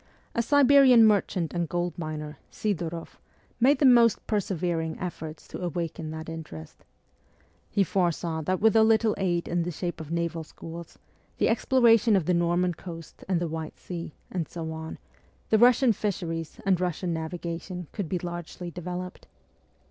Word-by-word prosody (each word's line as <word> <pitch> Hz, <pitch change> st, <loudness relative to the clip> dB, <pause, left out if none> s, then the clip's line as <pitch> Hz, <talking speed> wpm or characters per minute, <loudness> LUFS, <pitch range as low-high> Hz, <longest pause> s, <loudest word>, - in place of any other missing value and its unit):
A 235 Hz, -, +1 dB
Siberian 270 Hz, -2 st, +6 dB
merchant 195 Hz, -5 st, +1 dB
and 170 Hz, -2 st, -1 dB
goldminer, 155 Hz, -4 st, -4 dB
Sfdoroff, 170 Hz, -5 st, -4 dB, 0.4 s
made 265 Hz, +4 st, +5 dB
the 280 Hz, -, +2 dB
most 235 Hz, -4 st, +5 dB
persevering 175 Hz, -6 st, -1 dB
efforts 160 Hz, -3 st, -6 dB
to -, -, -7 dB
awaken 165 Hz, -2 st, -3 dB
that 160 Hz, 0 st, -6 dB
interest. 155 Hz, -, -9 dB, 0.9 s
He 200 Hz, -, +2 dB
foresaw 170 Hz, -3 st, 0 dB
that 185 Hz, +4 st, -1 dB
with 220 Hz, 0 st, +4 dB
a 220 Hz, -, +7 dB
little 220 Hz, 0 st, +4 dB
aid 175 Hz, -3 st, 0 dB
in 175 Hz, 0 st, 0 dB
the 170 Hz, -, -2 dB
shape 175 Hz, 0 st, -4 dB
of 155 Hz, -, -8 dB
naval 170 Hz, 0 st, -2 dB
schools, 165 Hz, +1 st, -10 dB, 0.4 s
the -, -, +2 dB
exploration 230 Hz, -2 st, +4 dB
of 185 Hz, -5 st, +1 dB
the 180 Hz, -, +2 dB
Norman 175 Hz, +1 st, +2 dB
Coast 165 Hz, -1 st, -10 dB
and 180 Hz, -3 st, +2 dB
the 175 Hz, -, -1 dB
White 160 Hz, -1 st, -5 dB
Sea, 170 Hz, -3 st, -7 dB, 0.2 s
and 175 Hz, -4 st, -2 dB
so 160 Hz, -2 st, -5 dB
on, 160 Hz, 0 st, -6 dB, 0.5 s
the 220 Hz, -, +5 dB
Russian 245 Hz, 0 st, +5 dB
fisheries 170 Hz, -6 st, -3 dB
and 190 Hz, -3 st, +3 dB
Eussian 180 Hz, 0 st, -2 dB
navigation 170 Hz, +2 st, -4 dB
could 195 Hz, -7 st, -4 dB
be 185 Hz, -, 0 dB
largely 175 Hz, 0 st, -6 dB
developed. 180 Hz, +1 st, -6 dB
175 Hz, 155 wpm, -27 LUFS, 165-200 Hz, 0.9 s, a